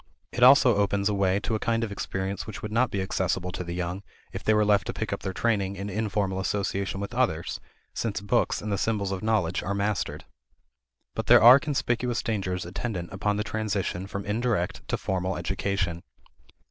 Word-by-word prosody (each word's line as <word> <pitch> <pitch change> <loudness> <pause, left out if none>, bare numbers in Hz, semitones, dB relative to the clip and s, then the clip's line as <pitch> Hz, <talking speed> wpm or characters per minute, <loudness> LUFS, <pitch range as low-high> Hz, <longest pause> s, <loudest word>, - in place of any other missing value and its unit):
It 125 - -4
also 125 -3 +7
opens 100 0 +1
a - - 0
way 100 -1 +2
to 115 - -2
a 110 - 0
kind 115 +1 0
of 110 - -3
experience 95 0 -4
which 110 - -7
would 105 - -4
not 120 +2 +2
be 100 -3 -2
accessible 95 -1 -1
to 90 - -4
the 85 0 -5
young, 90 +2 -3 0.3
if - - -6
they 110 - +3
were 105 0 +3
left 105 -1 +3
to - - -2
pick - - -3
up - - -3
their 95 - -3
training 100 -2 0
in 100 +1 -5
informal 100 -2 -1
association 100 0 -2
with 100 +3 -5
others, 115 -10 0 0.3
since 110 -3 -2
books 100 0 0
and 105 - -3
the 100 - 0
symbols 100 -3 0
of 95 - -3
knowledge 105 -6 +1
are 100 - -2
mastered. 100 -1 -2 0.9
But - - -4
there - - +7
are 125 +4 +10
conspicuous 125 -5 -1
dangers 95 -5 -2
attendant 90 -1 -4
upon 105 +1 0
the 105 - 0
transition 100 -4 -2
from 100 0 -5
indirect 105 -3 -1
to - - -1
formal 95 -1 -2
education. 90 -1 -2
100 Hz, 200 wpm, -27 LUFS, 95-110 Hz, 0.9 s, are